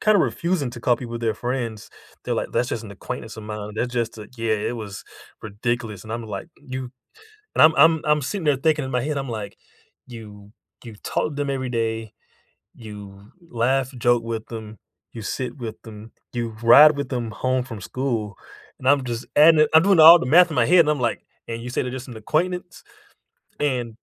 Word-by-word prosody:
kinda 215 -1 +4
refusing 170 -5 0
to 120 0 -10
call 120 +1 +2
people 120 -2 -6
their 115 -2 -1
friends, 120 -2 -4 0.3
they're - - -1
like, - - -3
"That's 125 - 0
just 115 -5 -3
an 105 - -10
acquaintance 110 +3 -7
of 110 - -9
mine," 105 0 -6
or - - -12
"That 120 +3 -1
just 120 -2 -3
a" 105 - -10
Yeah, 115 -1 0
it 105 +3 -3
was 105 -3 -8 0.4
ridiculous, 110 -1 -4
and 110 - -7
I'm 115 0 -4
like, 100 +6 -6
"You" 130 -3 -7 0.7
and - - +3
I'm 155 0 +6
I'm 160 +2 +5
I'm 150 0 +2
sitting 185 +5 -4
there 145 -2 +3
thinking 150 0 +1
in - - -5
my 125 -1 0
head, 150 +1 -2
I'm 135 -2 -4
like, 105 -3 -6 0.5
"You 105 -4 -12 0.3
You 115 -3 -10
talk - - -1
to 150 - -9
them 145 -1 -2
every 130 -2 -3
day, 115 -2 -2 0.6
you 105 -2 -12 0.2
laugh, 130 +3 0
joke 120 0 +2
with 115 -1 -4
them, 110 -2 -8 0.3
you 115 - -8
sit 130 +6 -4
with 115 -3 -7
them, 110 0 -12 0.2
you 115 -2 -3
ride 150 +6 +8
with 140 - -3
them 120 -4 -3
home 130 +4 -1
from 115 -5 -8
school," 115 -3 -3 0.4
and 130 - -9
I'm 140 -1 +4
just 120 0 -4
adding 155 +1 +7
it 155 - +1
I'm 160 - +8
doing 195 -1 +3
all 165 +2 +10
the 130 - -4
math 175 +6 +6
in 155 - -5
my - - +3
head, 180 +2 +6
and 155 -2 +4
I'm 150 -3 -1
like, 120 -2 -1 0.2
"and 115 0 -5
you 125 - -6
said 125 - -2
it's 125 - -5
just 130 +1 -7
an 120 - -9
acquaintance?" 175 - -2 0.8
and 125 -6 -1
120 Hz, 215 wpm, -22 LUFS, 110-145 Hz, 0.8 s, all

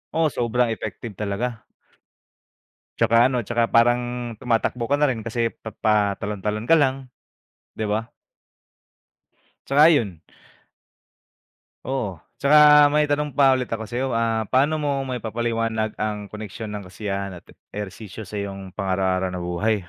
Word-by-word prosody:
Oo, 160 -3 +2
sobrang 120 0 0
effective 110 +1 -5
talaga. 110 +3 -3 1.3
'Tsaka 115 - +2
ano, 130 - -1
'tsaka 115 -1 0
parang 120 +1 +4 0.4
tumatakbo 120 0 0
ka 145 - +3
na 150 - +3
rin 125 -5 -1
kasi 115 +1 -2
pa 110 - -9
patalon-talon 105 0 0
ka 165 - +4
lang. 135 -4 +1 0.6
'Di - - -5
ba? 110 +2 -1 1.6
'Tsaka 145 +3 +6
yun. 100 - 0 1.6
Oo, 115 -10 -3 0.2
'tsaka 150 0 +7
may 150 +1 +3
tanong 145 0 -2
pa 135 -2 +6
ulit 130 -1 -2
ako 110 -1 -3
sa'yo 125 +4 -2
ah, 115 -2 0
paano 145 +4 +2
mo 140 -2 -1
maipapaliwanag 115 -2 -2
ang 105 -1 -2
koneksyon 105 +1 -7
ng 100 -2 -6
kasiyahan 100 -1 -4
at - - -16 0.2
ehersisyo 105 +1 -7
sa 105 +2 -5
iyong 95 -2 -7
pang-araw-araw 95 -1 0
na 90 - -5
buhay? 90 +6 0
115 Hz, 135 wpm, -23 LUFS, 105-130 Hz, 1.6 s, tsaka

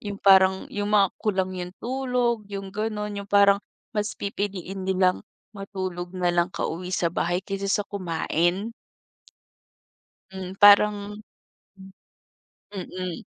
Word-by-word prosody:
Yung 205 -1 -5
parang, 190 -1 +5
yung 205 0 -2
mga 200 -3 +4
kulang 190 -3 0
yung 180 0 -6
tulog, 245 -3 -1
yung 195 -1 -6
ganun 210 -1 -3
yung 200 0 -8
parang, 200 0 +5 0.3
mas 210 -1 -2
pipiliin 195 -1 -4
nilang 185 -1 +2 0.3
matulog 185 -3 -5
nalang 175 -1 +1
ka-uwi 180 0 -4
sa 170 -2 0
bahay 175 +2 -1
kaysa 195 0 -3
sa 205 +1 +1
kumain. 180 +2 -1 1.6
Hmm, 190 -1 -7
parang 205 0 +5 0.6
Mm. 190 0 -13 1.0
Mm. 185 -2 -5
195 Hz, 115 wpm, -25 LUFS, 185-205 Hz, 1.6 s, parang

